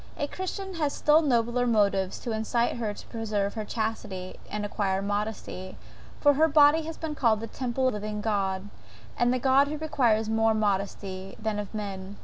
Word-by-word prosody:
A 290 Hz, -, 0 dB
Christian 375 Hz, +4 st, -5 dB
has 290 Hz, -2 st, +1 dB
still 300 Hz, +2 st, +4 dB
nobler 245 Hz, -3 st, +1 dB
motives 200 Hz, -4 st, +2 dB
to 235 Hz, -, -3 dB
incite 230 Hz, +3 st, 0 dB
her 225 Hz, -3 st, -1 dB
to 205 Hz, -, -10 dB
preserve 210 Hz, -3 st, -1 dB
her 220 Hz, -, -3 dB
chastity 215 Hz, -4 st, -4 dB
and 210 Hz, 0 st, -3 dB
acquire 200 Hz, -2 st, 0 dB
modesty, 205 Hz, -2 st, -4 dB, 0.4 s
for 290 Hz, -1 st, +5 dB
her 315 Hz, +3 st, +4 dB
body 300 Hz, +1 st, +6 dB
has 325 Hz, 0 st, -6 dB
been 320 Hz, -2 st, -4 dB
called 230 Hz, -7 st, +2 dB
the 225 Hz, -, -4 dB
Temple 255 Hz, +2 st, -2 dB
of -, -, -4 dB
the 210 Hz, -, -3 dB
living 210 Hz, 0 st, -4 dB
God; 200 Hz, -2 st, -1 dB, 0.5 s
of 240 Hz, -, +4 dB
that 250 Hz, 0 st, +1 dB
God 270 Hz, +1 st, +5 dB
who 305 Hz, +1 st, -3 dB
requires 240 Hz, -8 st, +1 dB
more 225 Hz, 0 st, +3 dB
than 220 Hz, -, 0 dB
modesty 195 Hz, -2 st, -2 dB
of 210 Hz, -2 st, -2 dB
mien. 200 Hz, -1 st, -5 dB
220 Hz, 185 wpm, -27 LUFS, 205-260 Hz, 0.5 s, body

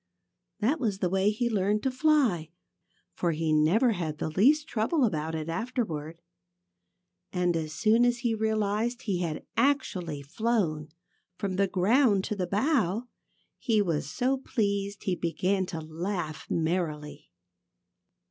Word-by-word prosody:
That 270 Hz, +10 st, +2 dB
was 215 Hz, -7 st, -1 dB
the 180 Hz, -2 st, -1 dB
way 195 Hz, +1 st, +3 dB
he 220 Hz, +3 st, 0 dB
learned 210 Hz, -1 st, +1 dB
to 265 Hz, -, +1 dB
fly, 255 Hz, -, +2 dB, 0.6 s
for 170 Hz, -2 st, 0 dB
he 155 Hz, 0 st, 0 dB
never 175 Hz, +11 st, +4 dB
had 165 Hz, -7 st, -3 dB
the 155 Hz, -, -3 dB
least 285 Hz, -, +4 dB
trouble 250 Hz, +6 st, +1 dB
about 160 Hz, -5 st, -2 dB
it 155 Hz, -1 st, -4 dB
afterward. 165 Hz, -5 st, -3 dB, 1.1 s
And 180 Hz, -2 st, +1 dB
as 155 Hz, -2 st, -2 dB
soon 225 Hz, +6 st, +3 dB
as 245 Hz, 0 st, +3 dB
he 230 Hz, -, +2 dB
realized 220 Hz, +2 st, 0 dB
that -, -, -16 dB
he 195 Hz, -6 st, -1 dB
had 165 Hz, -3 st, -3 dB
actually 180 Hz, -, 0 dB
flown 165 Hz, -, -1 dB, 0.5 s
from 195 Hz, -2 st, -2 dB
the 200 Hz, 0 st, +3 dB
ground 205 Hz, +2 st, +3 dB
to 210 Hz, -, -3 dB
the 185 Hz, -3 st, -2 dB
bough 225 Hz, -, +1 dB, 0.5 s
he 225 Hz, -4 st, +2 dB
was 165 Hz, -8 st, 0 dB
so 255 Hz, -, 0 dB
pleased 200 Hz, -6 st, -2 dB
that -, -, -15 dB
he 185 Hz, -, +1 dB
began 185 Hz, +3 st, 0 dB
to 170 Hz, -3 st, -5 dB
laugh 160 Hz, 0 st, -4 dB
merrily. 160 Hz, -3 st, -2 dB
195 Hz, 150 wpm, -28 LUFS, 165-230 Hz, 1.1 s, never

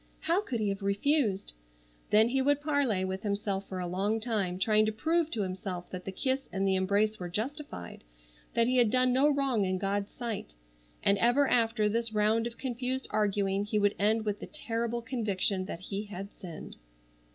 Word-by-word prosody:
How 345 Hz, +4 st, +2 dB
could 255 Hz, -, -3 dB
he 210 Hz, -2 st, +1 dB
have 195 Hz, +1 st, -3 dB
refused? 200 Hz, -, +1 dB, 0.6 s
Then 220 Hz, +2 st, +5 dB
he 265 Hz, +2 st, +1 dB
would 285 Hz, +1 st, +3 dB
parley 275 Hz, -11 st, +1 dB
with 190 Hz, 0 st, -3 dB
himself 200 Hz, -1 st, -2 dB
for 190 Hz, -, -4 dB
a 180 Hz, -, -2 dB
long 195 Hz, +5 st, 0 dB
time 210 Hz, -6 st, -1 dB
trying 215 Hz, +3 st, +4 dB
to -, -, +1 dB
prove 320 Hz, +8 st, +1 dB
to 225 Hz, -9 st, -1 dB
himself 185 Hz, -1 st, -5 dB
that 180 Hz, -1 st, -6 dB
the 195 Hz, -, -3 dB
kiss 265 Hz, +6 st, -2 dB
and 195 Hz, 0 st, 0 dB
the 190 Hz, -, +3 dB
embrace 205 Hz, +3 st, +1 dB
were 180 Hz, -1 st, -5 dB
justified, 220 Hz, -, -5 dB, 0.5 s
that 230 Hz, -, +4 dB
he 255 Hz, +2 st, +2 dB
had 240 Hz, -3 st, +5 dB
done 255 Hz, +1 st, +4 dB
no 275 Hz, +4 st, +5 dB
wrong 270 Hz, -6 st, +1 dB
in 185 Hz, -1 st, 0 dB
God's 200 Hz, +1 st, -1 dB
sight. 230 Hz, -, -5 dB, 0.5 s
And 200 Hz, 0 st, +3 dB
ever 245 Hz, +6 st, +4 dB
after 225 Hz, -3 st, +2 dB
this 230 Hz, +1 st, 0 dB
round 215 Hz, +2 st, +2 dB
of 235 Hz, -, -9 dB
confused 255 Hz, 0 st, -2 dB
arguing 200 Hz, -1 st, +1 dB
he 210 Hz, +1 st, -1 dB
would 205 Hz, -1 st, +3 dB
end 215 Hz, +2 st, +2 dB
with 210 Hz, -1 st, -1 dB
the -, -, -7 dB
terrible 235 Hz, -4 st, -3 dB
conviction 205 Hz, -6 st, -1 dB
that 170 Hz, -, -6 dB
he 200 Hz, +2 st, -4 dB
had 200 Hz, 0 st, -7 dB
sinned. 175 Hz, -5 st, -9 dB
215 Hz, 195 wpm, -30 LUFS, 195-245 Hz, 0.6 s, Then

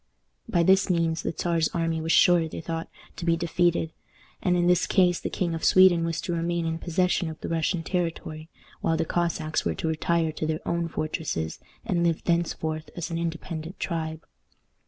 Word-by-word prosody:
By 175 Hz, -6 st, +3 dB
this 190 Hz, +3 st, +4 dB
means 165 Hz, -2 st, +1 dB
the -, -, -2 dB
Czar's 165 Hz, -2 st, 0 dB
army 165 Hz, -1 st, 0 dB
was 165 Hz, +1 st, -1 dB
sure, 175 Hz, -2 st, +5 dB
they -, -, -6 dB
thought, 165 Hz, 0 st, -4 dB, 0.3 s
to -, -, -6 dB
be 165 Hz, 0 st, +2 dB
defeated; 170 Hz, -1 st, +1 dB, 0.5 s
and 180 Hz, -1 st, +2 dB
in 175 Hz, -, +2 dB
this 180 Hz, 0 st, +3 dB
case 180 Hz, -3 st, +3 dB
the -, -, -3 dB
King 175 Hz, -3 st, -1 dB
of 165 Hz, -, -4 dB
Sweden 185 Hz, -3 st, +6 dB
was 165 Hz, -1 st, -2 dB
to 180 Hz, -, -3 dB
remain 170 Hz, 0 st, -1 dB
in 165 Hz, 0 st, -2 dB
possession 180 Hz, 0 st, +1 dB
of 160 Hz, -, -8 dB
the -, -, -4 dB
Russian 165 Hz, +1 st, 0 dB
territory, 165 Hz, -3 st, -3 dB, 0.3 s
while 165 Hz, -, +1 dB
the 165 Hz, -, 0 dB
Cossacks 165 Hz, -2 st, -1 dB
were 80 Hz, -, -1 dB
to -, -, -3 dB
retire 160 Hz, +1 st, +1 dB
to 155 Hz, 0 st, -3 dB
their 155 Hz, 0 st, -3 dB
own 170 Hz, 0 st, 0 dB
fortresses, 155 Hz, -, -3 dB, 0.3 s
and 170 Hz, -2 st, +1 dB
live 165 Hz, -2 st, +1 dB
thenceforth 160 Hz, -2 st, -1 dB
as 170 Hz, -1 st, -4 dB
an 165 Hz, -, -2 dB
independent 165 Hz, +1 st, -5 dB
tribe. 160 Hz, -2 st, -3 dB
165 Hz, 190 wpm, -26 LUFS, 160-175 Hz, 0.5 s, Sweden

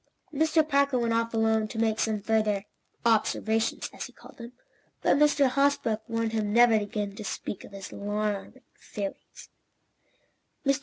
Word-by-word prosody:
Mr. 315 Hz, +1 st, +2 dB
Parker 280 Hz, -2 st, +2 dB
went 235 Hz, -1 st, +1 dB
off 230 Hz, 0 st, 0 dB
alone, 220 Hz, -1 st, +2 dB
to 225 Hz, -, -8 dB
make 220 Hz, -1 st, +1 dB
some 215 Hz, -2 st, 0 dB
further 215 Hz, -2 st, +1 dB, 0.4 s
"observations" 225 Hz, 0 st, +1 dB
as -, -, -6 dB
he -, -, -17 dB
called -, -, -16 dB
them, 235 Hz, +1 st, -9 dB, 0.5 s
but -, -, +4 dB
Mr. 290 Hz, -1 st, +4 dB
Hosbrook 260 Hz, -5 st, +1 dB
warned 230 Hz, -1 st, -1 dB
him 215 Hz, -2 st, -1 dB
never 240 Hz, +1 st, +6 dB
again 205 Hz, -1 st, -1 dB
to 215 Hz, -, -6 dB
speak 200 Hz, 0 st, -5 dB
of -, -, -12 dB
his 195 Hz, -1 st, -8 dB
alarming 210 Hz, +4 st, -3 dB, 0.2 s
theories. 200 Hz, -2 st, -7 dB
225 Hz, 150 wpm, -28 LUFS, 210-240 Hz, 0.5 s, never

